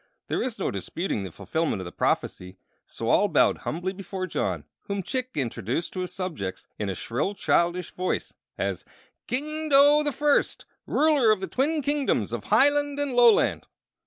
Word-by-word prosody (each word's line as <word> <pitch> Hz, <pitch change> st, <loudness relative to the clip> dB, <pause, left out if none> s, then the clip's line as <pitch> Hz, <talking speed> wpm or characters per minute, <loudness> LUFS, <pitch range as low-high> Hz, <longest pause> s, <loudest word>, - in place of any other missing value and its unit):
There -, -, 0 dB
was 250 Hz, -3 st, -2 dB
no 195 Hz, -, -1 dB
disputing 105 Hz, -, -3 dB
the 95 Hz, -, -6 dB
fulfillment 100 Hz, -, -2 dB
of 95 Hz, -, -6 dB
the 85 Hz, -, -7 dB
prophecy; 90 Hz, +1 st, -2 dB, 0.3 s
so -, -, -5 dB
all -, -, +4 dB
bowed -, -, +3 dB
humbly 180 Hz, +4 st, -3 dB
before 190 Hz, -1 st, -5 dB
John, 90 Hz, -, -2 dB, 0.2 s
whom 200 Hz, -1 st, -3 dB
Chick 255 Hz, +6 st, -3 dB
introduced 125 Hz, -, -2 dB
to 185 Hz, -, -4 dB
his 180 Hz, -1 st, -3 dB
subjects 155 Hz, -, -5 dB
in 105 Hz, -, -2 dB
a 95 Hz, -, -3 dB
shrill, 140 Hz, -, -2 dB
childish 175 Hz, -1 st, +1 dB
voice 185 Hz, 0 st, -2 dB, 0.2 s
as -, -, -2 dB, 0.4 s
"King 305 Hz, +4 st, -3 dB
Dough 290 Hz, +1 st, +6 dB
the 295 Hz, -1 st, 0 dB
First, 295 Hz, +1 st, +1 dB, 0.2 s
ruler 295 Hz, -7 st, +3 dB
of 215 Hz, -2 st, +4 dB
the 190 Hz, -, -3 dB
Twin 295 Hz, +7 st, 0 dB
Kingdoms 290 Hz, 0 st, 0 dB
of -, -, -4 dB
Hiland 290 Hz, 0 st, +3 dB
and 285 Hz, -2 st, 0 dB
Loland." 240 Hz, -2 st, +4 dB
195 Hz, 170 wpm, -26 LUFS, -, 0.4 s, Dough